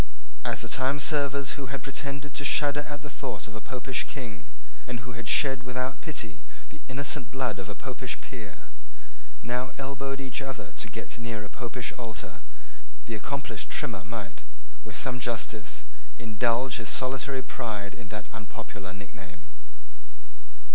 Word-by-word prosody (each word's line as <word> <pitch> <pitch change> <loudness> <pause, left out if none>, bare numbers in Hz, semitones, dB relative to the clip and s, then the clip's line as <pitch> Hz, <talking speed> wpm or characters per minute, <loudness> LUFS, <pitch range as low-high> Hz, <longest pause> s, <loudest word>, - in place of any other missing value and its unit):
As - - +2
the - - -1
timeservers 140 +1 +4
who 135 - -1
had 130 -1 -2
pretended 140 0 -2
to - - +1
shudder 145 +1 +6
at 145 0 -3
the 145 - -3
thought 135 -5 -1
of 105 - -7
a 110 - -4
Popish 130 0 0
king, 115 - -4 0.4
and 120 -2 -1
who 125 +1 -5
had 115 -1 -4
shed 135 -1 +7
without 125 +1 0
pity 110 - -3 0.3
the - - -10
innocent 140 0 +1
blood 125 -6 +2
of 95 - -5
a 105 - -2
Popish - - -1
peer, - - -7 0.7
now 125 +2 +2
elbowed 135 0 0
each 130 -1 0
other 135 -4 -3
to - - -1
get 110 +2 -4
near 115 -3 -1
a - - -7
Popish 125 -1 -1
altar, 115 -3 -4 0.6
the - - -2
accomplished 140 +7 -1
Trimmer 95 - +1
might, 105 -3 -4 0.4
with - - -5
some 125 -1 +3
justice, 110 - 0 0.3
indulge 115 +3 +4
his 115 -3 -1
solitary 130 +1 +2
pride 105 -3 -1
in 115 - -7
that 105 +1 -3
unpopular 105 -3 -5
nickname. 95 -4 -8
125 Hz, 155 wpm, -32 LUFS, 110-135 Hz, 0.7 s, shed